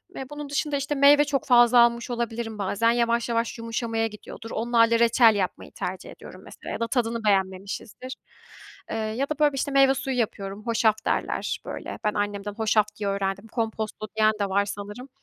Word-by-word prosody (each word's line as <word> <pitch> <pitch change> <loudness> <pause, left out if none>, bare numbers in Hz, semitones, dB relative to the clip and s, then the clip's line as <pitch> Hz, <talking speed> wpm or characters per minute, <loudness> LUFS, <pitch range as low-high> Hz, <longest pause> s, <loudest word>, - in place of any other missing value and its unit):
Ve 265 -1 -7
bunun 295 -1 -7
dışında, 295 -1 -1
işte, 280 +1 -2
meyve 285 +1 +6
çok 280 -2 -1
fazla 240 -2 +6
almış 235 0 +3
olabilirim 235 -2 -3
bazen, 205 +3 +1
yavaş 235 0 +1
yavaş 230 0 -1
yumuşamaya 230 0 -2
gidiyordur. 225 +1 -10
Onlarla 230 0 +2
reçel 230 -1 +5
yapmayı 190 -3 -3
tercih - - -6
ediyorum - - -12
mesela - - -10
ya - - -4
da 230 - -1
tadını 230 -3 -1
beğenmemişizdir. 200 +5 -2 0.7
Eee, - - -3
ya 220 +6 -2
da 305 - -3
böyle 295 -2 +4
bir, - - -5
işte, 285 +2 -1
meyve 275 -1 +5
suyu 265 -1 -3
yapıyorum, 200 -2 -3
"hoşaf" 220 -2 +1
derler, - - -1
böyle. - - -6
Ben 210 - +1
annemden 205 0 -3
hoşaf 215 0 +2
diye 205 -1 -2
öğrendim. 195 +1 -2
Komposto 220 -2 -4
diyen 215 0 +4
de 200 -1 0
var 200 +1 +2
sanırım. 205 +6 -7
230 Hz, 180 wpm, -25 LUFS, 210-250 Hz, 0.7 s, meyve